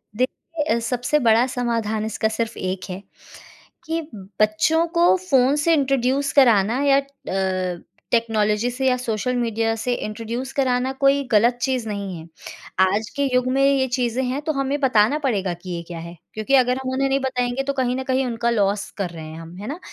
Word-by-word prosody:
देखिए, 285 +6 -2
ए - - 0
सबसे 245 +5 0
बड़ा 230 -2 +4
समाधान 230 -4 -1
इसका 220 0 -1
सिर्फ़ 220 +1 -3
एक 185 0 -3
है 185 +1 -5 0.8
कि 325 +1 -1 0.4
बच्चों 215 +11 +3
को 345 +2 +5
फ़ोन 265 +1 +4
से 335 - +4
इंट्रोड्यूस 275 -1 +1
कराना 235 -2 +4
या 275 -1 +5
अ, 190 -9 -3 0.3
टेक्नोलॉज़ी 220 -1 +1
से 265 +2 -1
या 255 - +4
सोशल 250 0 -2
मीडिया 225 -2 0
से 245 +2 -1
इंट्रोड्यूस 230 +4 -4
कराना 255 -1 +1
कोई 275 0 +3
गलत 235 +3 +4
चीज़ 255 -4 -1
नहीं 200 -4 -4
है। 160 - -10 0.5
आज 200 +4 +2
के 280 - 0
युग 250 0 +2
में 270 +1 +2
ये 275 -1 +3
चीज़ें 250 0 0
हैं 260 +3 -2
तो 310 - -1
हमें 275 +1 -1
बताना 255 0 +3
पड़ेगा 205 -11 0
कि 175 +2 -11
ये 170 - -4
क्या 170 -2 -7
है, 170 +1 -8 0.2
क्योंकि 215 +6 +1
अगर 250 -1 +3
हम 260 - -3
उन्हें 270 +1 +1
नहीं 275 - +2
बताएँगे 255 -1 -1
तो 280 +1 -2
कहीं 255 -2 0
न 265 - -3
कहीं 260 0 0
उनका 235 -1 -1
लॉस 205 -2 0
कर 190 -3 -2
रहे 165 -2 -9
हैं 160 +1 -9
हम, 165 +1 -10
है 205 +3 -7
ना? 300 +7 -5
245 Hz, 195 wpm, -22 LUFS, 210-265 Hz, 0.8 s, को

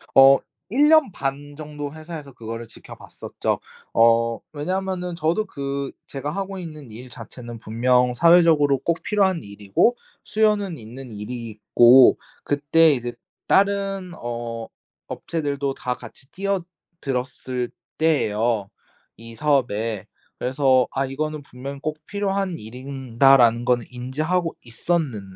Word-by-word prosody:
어 135 0 +9 0.3
1 290 +5 +4
년 315 -9 +5
반 145 +1 -4
정도 150 -1 -7
회사에서 155 -3 -8
그거를 115 0 -7
지켜봤었죠. - - -5 0.3
어 115 0 +4
왜냐하면은 180 +3 -3
저도 170 +6 0
그 140 -4 -4 0.2
제가 145 +2 -4
하고 195 +1 -4
있는 155 -7 -8
일 120 +4 -10
자체는 120 0 -9
분명 125 +3 +2
사회적으로 160 -2 +5
꼭 170 +4 -2
필요한 190 - +1
일이고 100 - +1 0.3
수요는 210 -5 +1
있는 120 +3 -10
일이고 120 +3 +4 0.3
그때 145 +2 +4
이제 120 -1 -4 0.3
다른 195 -2 +1
어 115 -1 -5 0.4
업체들도 140 -4 -3
다 125 - -2
같이 130 +2 -13
뛰어들었을 155 -10 -4 0.3
때예요 115 -9 +1 0.5
이 115 0 -11
사업에. 115 -8 0 0.3
그래서 130 0 +3
'아 135 +1 +1
이거는 150 +2 -4
분명 140 +2 -8
꼭 155 +1 -3
필요한 195 -3 -1
일이다.'라는 125 0 +2
건 125 -2 +3
인지하고 155 +8 -2
있었는 130 - -1
140 Hz, 260 characters per minute, -23 LUFS, 120-165 Hz, 0.5 s, 어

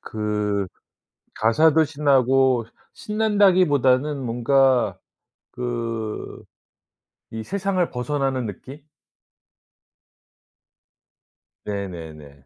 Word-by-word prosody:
그 105 -2 -2 0.7
가사도 155 +8 +4
신나고 135 -4 +2 0.3
신난다기보다는 180 - +2
뭔가 120 -3 +2 0.5
그 115 -3 -5 0.9
이 110 0 -6
세상을 190 - -1
벗어나는 135 0 -2
느낌? 130 +7 -9 2.9
네네네. 80 -9 -7
125 Hz, 145 characters per minute, -22 LUFS, 110-145 Hz, 2.9 s, 가사도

